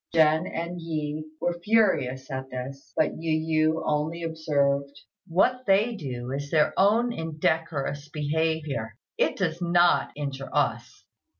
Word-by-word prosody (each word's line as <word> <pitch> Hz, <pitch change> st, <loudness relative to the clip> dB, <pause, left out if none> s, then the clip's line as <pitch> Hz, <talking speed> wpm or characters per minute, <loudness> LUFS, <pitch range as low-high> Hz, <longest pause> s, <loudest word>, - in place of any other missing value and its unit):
Jen 160 Hz, +1 st, +4 dB
and 170 Hz, +1 st, -4 dB
Yi 155 Hz, -2 st, -3 dB
were 175 Hz, 0 st, -1 dB
furious 140 Hz, -, +2 dB
at 130 Hz, 0 st, -4 dB
this; 130 Hz, +2 st, -7 dB
but 155 Hz, -, +3 dB
Yu 155 Hz, -1 st, +2 dB
yü -, -, -4 dB
only 155 Hz, +3 st, -1 dB
observed, 140 Hz, -3 st, 0 dB, 0.3 s
"What 250 Hz, +9 st, +2 dB
they 205 Hz, +5 st, +3 dB
do 125 Hz, -, -5 dB
is 140 Hz, +1 st, -4 dB
their 155 Hz, -1 st, +3 dB
own 230 Hz, +5 st, +3 dB
indecorous 155 Hz, -3 st, -2 dB
behaviour; 150 Hz, -7 st, -1 dB, 0.2 s
it -, -, +2 dB
does 175 Hz, -2 st, -1 dB
not 175 Hz, 0 st, +4 dB
injure 140 Hz, -2 st, -5 dB
us." -, -, -1 dB
155 Hz, 130 wpm, -26 LUFS, 140-170 Hz, 0.3 s, Jen